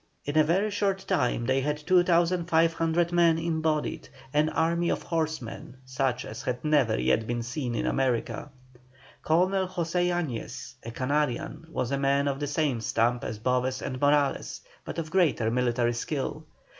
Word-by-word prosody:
In 145 - -3
a 155 - +6
very 190 +7 +1
short 195 -1 -1
time 120 -1 +1
they 130 +1 +2
had 150 +2 -1
2,500 170 -1 +2
men 170 -2 +4
embodied, 160 -2 -1 0.2
an 150 +1 +3
army 170 +2 +1
of - - -1
horsemen 155 -7 -3
such 130 -1 -1
as 110 - -7
had 125 +3 -3
never 145 - +3
yet 65 - +1
been 120 0 -2
seen 120 0 -3
in - - -1
America. 130 +2 -1 0.7
Colonel 185 +4 +2
José 175 -1 -1
Yañez, 160 -10 -4
a 115 - -6
Canarian, 145 +5 -2
was 130 -5 -2
a 140 - 0
man 140 +1 +2
of 135 -1 -1
the 145 - -2
same 145 -5 0
stamp 120 +2 +1
as 110 - -4
Boves 125 +3 0
and 130 -1 -5
Morales, 145 -1 +1 0.2
but - - -7
of 160 -1 -4
greater 155 -12 +2
military 120 -1 +1
skill. 150 +5 -3
150 Hz, 155 wpm, -27 LUFS, 125-165 Hz, 0.7 s, a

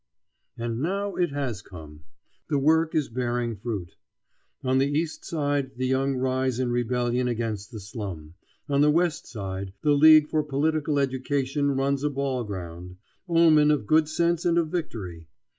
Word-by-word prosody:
And 115 0 -3
now 200 +5 -1
it 175 -2 0
has 135 -8 -3
come. 75 -6 -12 0.4
The 145 - +2
work 160 +3 +2
is 155 -3 +1
bearing 120 -1 -2
fruit. 100 -4 -5 0.7
On 130 0 +2
the 135 - +3
East 155 +3 -2
Side 145 -4 -2
the 130 - -1
young 135 +1 +1
rise 130 -1 0
in 125 -2 0
rebellion 120 +1 0
against 110 -4 -3
the 110 - -7
slum; 95 -7 -7 0.3
on 140 -1 +2
the 150 - +5
West 170 +1 +1
Side 95 -3 -5
the 150 - +4
League 155 +1 +7
for 155 0 +1
Political 150 +1 0
Education 140 +1 0
runs 135 +1 0
a 150 - +2
ball 135 -3 -2
ground. 90 -3 -7 0.3
Omen 160 -3 +5
of 150 -7 +1
good 155 +5 +3
sense 170 +1 +1
and 170 -1 +2
of 165 -2 +1
victory! 100 - -5
135 Hz, 160 wpm, -26 LUFS, 115-150 Hz, 0.7 s, League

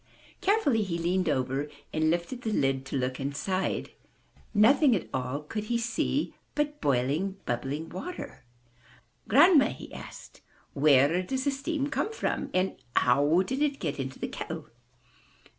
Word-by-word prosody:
Carefully 350 - +3
he 185 -5 -2
leaned 175 +1 +1
over 135 +1 -1 0.2
and 155 0 +2
lifted 175 +9 -1
the 225 - -2
lid 135 -7 0
to 135 - -2
look 130 0 -2
inside. 145 +8 -2 0.6
Nothing 250 +5 +5
at 185 - -3
all 130 +2 -2
could 210 +7 -4
he 235 +2 0
see 235 +5 -1 0.2
but 295 0 -1
boiling, 145 +9 0
bubbling 135 +6 -2
water. 185 - -7 0.9
''Grandma,'* 290 - +6
he - - -11
asked, - - -10 0.3
where 145 +4 +4
does 260 +8 -2
the 280 - +2
steam 280 +1 -2
come 435 - -1
from? 450 - -2 0.4
How 145 +8 +4
did 260 +8 -3
it 290 -2 +1
get 150 - -3
into 130 -1 -4
the - - -3
kettle?'' - - -6
180 Hz, 140 wpm, -28 LUFS, -, 0.9 s, Grandma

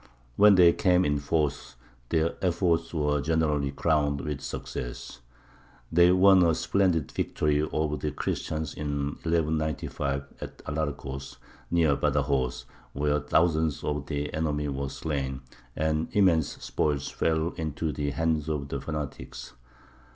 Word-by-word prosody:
When 105 +4 +7
they 85 -2 +7
came 90 -2 +3
in 75 0 +1
force 75 -1 -1 0.3
their 80 0 +1
efforts 85 -2 +1
were 75 -3 0
generally 75 -3 +1
crowned 75 0 +1
with 75 -2 -4
success. - - -6 0.7
They 85 +2 +6
won 95 +1 +6
a 85 -2 +4
splendid 90 -6 +1
victory 75 -1 0
over 75 0 -1
the 75 - -2
Christians 80 +1 -3
in 70 -1 -2
1195 75 -4 -1 0.2
at - - -7
Alarcos, 70 -3 -4 0.3
near 80 -4 +3
Badajoz, 65 -4 0 0.3
where 75 +1 +1
thousands 80 +1 +1
of 75 -1 -2
the 75 -1 -3
enemy 75 -2 -1
were 70 0 -3
slain, 70 -4 -3 0.3
and 80 0 0
immense 85 -7 +4 0.2
spoils 75 -2 -1
fell 80 0 0
into 80 -1 -3
the 75 -1 -2
hands 80 0 0
of 70 -2 -3
the 70 -1 -3
fanatics. 75 -2 -6
75 Hz, 130 wpm, -27 LUFS, 70-80 Hz, 0.7 s, When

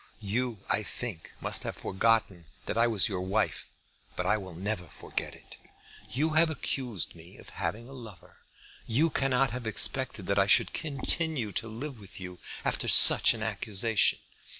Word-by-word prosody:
You 110 0 -3
I - - 0
think 105 -3 -7
must - - -1
have - - -5
forgotten 105 -4 -1 0.2
that - - -4
I 115 +1 +3
was 110 -4 +3
your 95 -4 -4
wife; 100 +4 -2 0.5
but 90 - -3
I 105 +3 +2
will 95 -5 -8
never 95 +1 -4
forget - - -7
it. - - -17 0.5
You 155 +5 -1
have 160 +1 +3
accused 125 - -3
me 85 +2 -15
of - - -15
having 115 +3 -5
a 135 - -12
lover. 115 -8 -13 0.5
You 150 +8 +1
cannot 135 -2 0
have 120 -1 -6
expected 115 -1 +2
that 100 +1 0
I 100 - +3
should - - +3
continue 150 - -2
to 115 - -4
live 120 +3 -8
with 100 -2 -14
you 90 -1 -9 0.3
after - - -1
such - - +9
an 110 - -6
accusation. 110 0 0
110 Hz, 170 wpm, -28 LUFS, 100-125 Hz, 0.5 s, such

